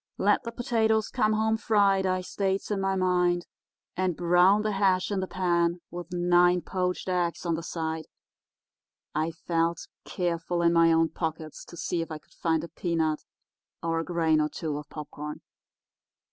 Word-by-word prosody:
'Let -, -, +3 dB
the 230 Hz, -, -3 dB
potatoes 220 Hz, -2 st, +1 dB
come 215 Hz, 0 st, +1 dB
home 220 Hz, +1 st, +1 dB
fried,' 200 Hz, -3 st, +3 dB
I 185 Hz, 0 st, 0 dB
states 195 Hz, +2 st, -2 dB
in 200 Hz, -2 st, 0 dB
my 195 Hz, 0 st, +1 dB
mind, 180 Hz, -1 st, +2 dB, 0.5 s
'and 185 Hz, -3 st, 0 dB
brown 180 Hz, +4 st, +4 dB
the 215 Hz, -, 0 dB
hash 195 Hz, -1 st, +2 dB
in 200 Hz, -, 0 dB
the 190 Hz, -, -2 dB
pan, 175 Hz, -2 st, +1 dB
with 175 Hz, 0 st, -7 dB
nine 175 Hz, 0 st, +4 dB
poached 180 Hz, 0 st, -2 dB
eggs 180 Hz, -1 st, -1 dB
on 170 Hz, -, +1 dB
the 160 Hz, -, -2 dB
side.' 160 Hz, -1 st, -4 dB, 1.1 s
I 155 Hz, +2 st, 0 dB
felt, 165 Hz, 0 st, -1 dB, 0.2 s
careful, 170 Hz, -1 st, -2 dB
in 170 Hz, 0 st, +4 dB
my 165 Hz, 0 st, +5 dB
own 165 Hz, 0 st, +3 dB
pockets 160 Hz, -2 st, -5 dB
to 170 Hz, -, -12 dB
see 170 Hz, 0 st, -1 dB
if 165 Hz, -, -5 dB
I 155 Hz, -, -5 dB
could -, -, -24 dB
find 160 Hz, -1 st, 0 dB
a -, -, -5 dB
peanut 160 Hz, -3 st, -1 dB, 0.6 s
or 165 Hz, 0 st, 0 dB
a -, -, -1 dB
grain 160 Hz, -3 st, +2 dB
or 150 Hz, -, 0 dB
two 155 Hz, -2 st, -4 dB
of 150 Hz, -, -11 dB
popcorn. 150 Hz, 0 st, -7 dB
175 Hz, 175 wpm, -27 LUFS, 165-190 Hz, 1.1 s, my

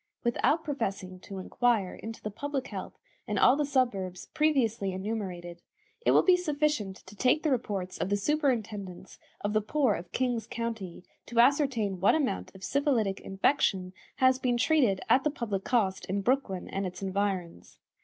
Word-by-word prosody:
Without 270 Hz, +6 st, +2 dB
professing 195 Hz, -10 st, -3 dB
to 195 Hz, +1 st, -9 dB
inquire 210 Hz, 0 st, +1 dB
into 225 Hz, 0 st, -8 dB
the 215 Hz, -, -3 dB
public 275 Hz, +4 st, -4 dB
health -, -, -7 dB, 0.3 s
in -, -, -1 dB
all 250 Hz, -, +6 dB
the 295 Hz, -1 st, 0 dB
suburbs 200 Hz, -10 st, -1 dB
previously 245 Hz, -11 st, +1 dB
enumerated, 185 Hz, -4 st, -5 dB, 0.4 s
it -, -, +2 dB
will -, -, +6 dB
be 370 Hz, -, +6 dB
sufficient 300 Hz, -, 0 dB
to 195 Hz, -, -13 dB
take 255 Hz, +8 st, +2 dB
the 310 Hz, -, +1 dB
reports 200 Hz, -7 st, -2 dB
of -, -, -1 dB
the 205 Hz, -, +2 dB
superintendents 215 Hz, -, -2 dB, 0.2 s
of 205 Hz, +1 st, -1 dB
the 215 Hz, -, +3 dB
poor 255 Hz, +1 st, +2 dB
of 175 Hz, -1 st, -6 dB
King's 245 Hz, -4 st, -1 dB
County 230 Hz, -7 st, -5 dB, 0.2 s
to 235 Hz, -, -7 dB
ascertain 245 Hz, -7 st, +3 dB
what 195 Hz, -, +4 dB
amount 190 Hz, -, -2 dB
of 190 Hz, -, -12 dB
syphilitic 245 Hz, -9 st, +1 dB
infection 190 Hz, -2 st, +1 dB, 0.2 s
has 260 Hz, -1 st, +4 dB
been 245 Hz, -2 st, +1 dB
treated 245 Hz, -8 st, +3 dB
at 265 Hz, -, +4 dB
the 300 Hz, -, +2 dB
public 215 Hz, -9 st, -3 dB
cost 205 Hz, -6 st, 0 dB
in 200 Hz, +2 st, -1 dB
Brooklyn 205 Hz, -5 st, 0 dB
and 195 Hz, 0 st, -2 dB
its 180 Hz, +2 st, -8 dB
environs. 190 Hz, -, -3 dB
220 Hz, 165 wpm, -29 LUFS, 190-265 Hz, 0.4 s, all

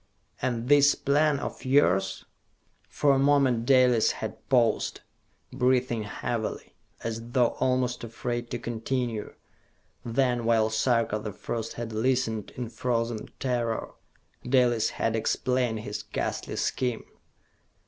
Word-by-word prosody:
"And 120 Hz, -1 st, -1 dB
this 145 Hz, 0 st, +6 dB
plan 145 Hz, +1 st, +2 dB
of -, -, -6 dB
yours?" 95 Hz, -8 st, +2 dB, 0.6 s
For 140 Hz, -1 st, +3 dB
a 135 Hz, -, +2 dB
moment 135 Hz, -4 st, +3 dB
Dalis 125 Hz, -4 st, +5 dB
had -, -, -7 dB
paused, 120 Hz, -4 st, +2 dB, 0.5 s
breathing 125 Hz, -3 st, +1 dB
heavily, 115 Hz, +2 st, -4 dB, 0.3 s
as 115 Hz, +1 st, -5 dB
though 125 Hz, -2 st, +4 dB
almost 125 Hz, -1 st, 0 dB
afraid 120 Hz, +1 st, -4 dB
to 120 Hz, -, -3 dB
continue. 120 Hz, -1 st, -3 dB, 0.7 s
Then, 120 Hz, 0 st, +1 dB
while 110 Hz, -1 st, +2 dB
Sarka 115 Hz, -1 st, +1 dB
the 105 Hz, 0 st, -5 dB
First 115 Hz, +3 st, -5 dB
had 115 Hz, -1 st, -6 dB
listened 115 Hz, -2 st, 0 dB
in 125 Hz, -3 st, -4 dB
frozen 115 Hz, -1 st, -2 dB
terror, 120 Hz, -3 st, -1 dB, 0.5 s
Dalis 125 Hz, -3 st, +3 dB
had 115 Hz, 0 st, 0 dB
explained 120 Hz, 0 st, 0 dB
his 105 Hz, -1 st, -5 dB
ghastly -, -, -4 dB
scheme. 125 Hz, -3 st, -1 dB
120 Hz, 115 wpm, -27 LUFS, 115-130 Hz, 0.7 s, this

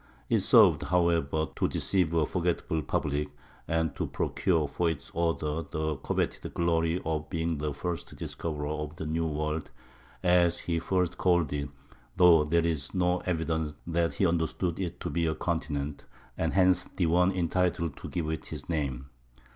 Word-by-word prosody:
It -, -, +4 dB
served, -, -, +6 dB
however, 80 Hz, -1 st, +1 dB
to -, -, +1 dB
deceive 90 Hz, -5 st, +1 dB
a 80 Hz, -2 st, +3 dB
forgetful 85 Hz, -2 st, -1 dB
public, 75 Hz, 0 st, -1 dB, 0.4 s
and 80 Hz, -1 st, 0 dB
to -, -, -2 dB
procure 80 Hz, -6 st, 0 dB
for 85 Hz, +4 st, 0 dB
its 80 Hz, -4 st, -5 dB
author 80 Hz, -2 st, 0 dB
the 80 Hz, -1 st, -1 dB
coveted 65 Hz, -, -2 dB
glory 85 Hz, 0 st, +1 dB
of 80 Hz, -1 st, -2 dB
being 80 Hz, -3 st, -1 dB
the 75 Hz, 0 st, -1 dB
first 85 Hz, +4 st, -4 dB
"discoverer" 75 Hz, -3 st, -4 dB
of 75 Hz, 0 st, -4 dB
the 80 Hz, -, -5 dB
"New 80 Hz, +1 st, 0 dB
World," 75 Hz, 0 st, -2 dB, 0.5 s
as 90 Hz, -1 st, +4 dB
he 85 Hz, -1 st, -1 dB
first 90 Hz, +1 st, 0 dB
called 85 Hz, -5 st, +2 dB
it 70 Hz, -1 st, -2 dB, 0.5 s
(though 85 Hz, -3 st, +7 dB
there 85 Hz, +2 st, +2 dB
is 80 Hz, -1 st, -2 dB
no 90 Hz, 0 st, +2 dB
evidence 80 Hz, -3 st, -1 dB
that 85 Hz, -3 st, 0 dB
he 95 Hz, -, +2 dB
understood 85 Hz, +1 st, 0 dB
it 90 Hz, -3 st, -3 dB
to -, -, -3 dB
be 85 Hz, +2 st, +1 dB
a 80 Hz, -, 0 dB
continent), 70 Hz, 0 st, -3 dB, 0.3 s
and 80 Hz, -, -1 dB
hence 90 Hz, -1 st, +4 dB
the 90 Hz, -, +1 dB
one 90 Hz, +3 st, +4 dB
entitled 85 Hz, -3 st, 0 dB
to -, -, -7 dB
give 85 Hz, -3 st, -2 dB
it 80 Hz, -, -4 dB
his -, -, -7 dB
name. 70 Hz, -5 st, -2 dB
80 Hz, 165 wpm, -29 LUFS, 75-85 Hz, 0.5 s, though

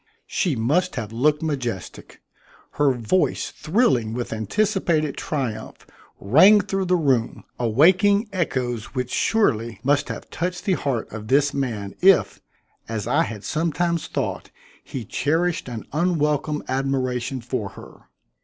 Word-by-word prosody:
She 175 Hz, -8 st, 0 dB
must 150 Hz, +11 st, +1 dB
have 110 Hz, -4 st, -4 dB
looked 150 Hz, +6 st, +1 dB
majestic. 125 Hz, -, -5 dB, 0.5 s
Her 145 Hz, -2 st, +2 dB
voice 125 Hz, +9 st, 0 dB
thrilling 145 Hz, -, +1 dB
with 120 Hz, -2 st, -3 dB
anticipated 155 Hz, -, 0 dB
triumph 130 Hz, -8 st, -4 dB, 0.3 s
rang 185 Hz, -, +6 dB
through 195 Hz, 0 st, -2 dB
the 180 Hz, 0 st, +2 dB
room, 135 Hz, -9 st, 0 dB, 0.2 s
awaking 185 Hz, -, +4 dB
echoes 125 Hz, -, -2 dB
which 125 Hz, -1 st, -2 dB
surely 120 Hz, -, +1 dB
must 140 Hz, +2 st, +1 dB
have -, -, -7 dB
touched 180 Hz, +1 st, -3 dB
the 195 Hz, -, +2 dB
heart 135 Hz, -9 st, -2 dB
of 110 Hz, -1 st, -7 dB
this 140 Hz, +3 st, +3 dB
man 115 Hz, -8 st, -3 dB
if, 190 Hz, 0 st, +4 dB, 0.5 s
as 110 Hz, -3 st, -3 dB
I -, -, +2 dB
had 105 Hz, -2 st, -4 dB
sometimes 170 Hz, +1 st, -1 dB
thought, -, -, -3 dB, 0.3 s
he 125 Hz, -4 st, -6 dB
cherished 165 Hz, -, 0 dB
an 115 Hz, -3 st, -6 dB
unwelcome 150 Hz, -3 st, 0 dB
admiration 130 Hz, -1 st, -1 dB
for 115 Hz, -3 st, -4 dB
her. -, -, -14 dB
140 Hz, 130 wpm, -23 LUFS, 120-170 Hz, 0.5 s, rang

